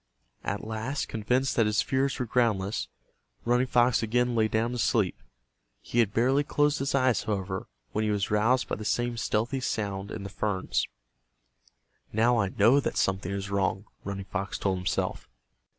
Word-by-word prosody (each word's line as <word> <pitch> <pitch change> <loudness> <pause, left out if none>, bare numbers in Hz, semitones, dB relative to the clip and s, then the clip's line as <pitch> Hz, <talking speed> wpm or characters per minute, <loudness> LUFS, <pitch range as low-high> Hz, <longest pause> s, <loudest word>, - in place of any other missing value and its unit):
At - - -3
last, 110 +6 -3
convinced 125 +4 0
that 115 -2 +3
his 105 0 +2
fears 135 0 0
were 125 - -1
groundless, 110 -4 0 0.6
Running 120 +2 +3
Fox 120 0 +3
again 125 +2 +1
lay 110 -2 +3
down 110 +2 0
to 125 - -4
sleep. 105 - +1 0.6
He 120 - -2
had 110 -4 +3
barely 130 +6 +3
closed 145 0 +1
his 135 +1 0
eyes, 130 -4 +3
however, 95 -3 -3 0.2
when 110 - 0
he 105 - +1
was 105 -1 0
roused 115 +5 +3
by - - -2
the 105 - -6
same 120 +2 0
stealthy 115 +3 0
sound 100 -5 -2
in 105 - -6
the 100 - -5
ferns. 100 -2 -1 1.2
"Now 115 +3 +3
I 100 -2 +1
know 115 +8 +4
that - - -2
something 95 -1 0
is 100 0 -4
wrong," 100 0 0 0.2
Running 100 0 -5
Fox 95 0 -3
told 95 -2 0
himself. 90 - -2
110 Hz, 170 wpm, -28 LUFS, 100-125 Hz, 1.2 s, know